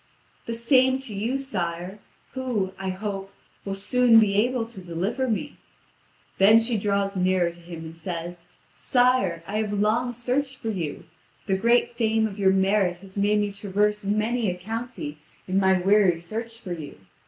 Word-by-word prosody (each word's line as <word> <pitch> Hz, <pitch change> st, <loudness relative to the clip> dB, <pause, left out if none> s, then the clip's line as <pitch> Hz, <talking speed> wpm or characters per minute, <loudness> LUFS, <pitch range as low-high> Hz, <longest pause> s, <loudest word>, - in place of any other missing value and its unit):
"The 230 Hz, -, -2 dB
same 260 Hz, +2 st, +4 dB
to 255 Hz, -5 st, -7 dB
you, 225 Hz, +7 st, -1 dB
sire, 185 Hz, -7 st, -3 dB, 0.3 s
who, 235 Hz, -8 st, -2 dB
I 190 Hz, 0 st, -3 dB
hope, 195 Hz, 0 st, -4 dB, 0.3 s
will 195 Hz, -1 st, -3 dB
soon 235 Hz, +3 st, +5 dB
be 210 Hz, -3 st, +3 dB
able 235 Hz, +3 st, +1 dB
to 225 Hz, -4 st, -11 dB
deliver 190 Hz, +10 st, -2 dB
me." 285 Hz, +7 st, -3 dB, 0.8 s
Then 210 Hz, +4 st, +7 dB
she 230 Hz, +1 st, -1 dB
draws 200 Hz, -1 st, 0 dB
nearer 185 Hz, -2 st, +2 dB
to 170 Hz, -, -16 dB
him, 170 Hz, -1 st, -9 dB
and 160 Hz, 0 st, -9 dB
says: 170 Hz, 0 st, -6 dB, 0.3 s
"Sire, 245 Hz, -10 st, +2 dB
I 205 Hz, +4 st, -3 dB
have 215 Hz, -1 st, -2 dB
long 215 Hz, +4 st, +1 dB
searched 255 Hz, +3 st, -2 dB
for 225 Hz, -, -3 dB
you. 170 Hz, -8 st, -4 dB, 0.4 s
The 195 Hz, -, 0 dB
great 235 Hz, +4 st, +2 dB
fame 220 Hz, -1 st, +2 dB
of 210 Hz, -1 st, -5 dB
your 195 Hz, -1 st, +4 dB
merit 190 Hz, -1 st, +2 dB
has 190 Hz, +1 st, -15 dB
made 210 Hz, +1 st, +2 dB
me 205 Hz, -1 st, -1 dB
traverse 205 Hz, +1 st, 0 dB
many 215 Hz, +2 st, 0 dB
a 180 Hz, -, -3 dB
county 220 Hz, -, -6 dB, 0.3 s
in 190 Hz, +1 st, +1 dB
my 190 Hz, -1 st, +3 dB
weary 195 Hz, -2 st, +4 dB
search 225 Hz, +7 st, -6 dB
for 185 Hz, -6 st, -5 dB
you. 155 Hz, -4 st, -8 dB
205 Hz, 170 wpm, -25 LUFS, 185-230 Hz, 0.8 s, Then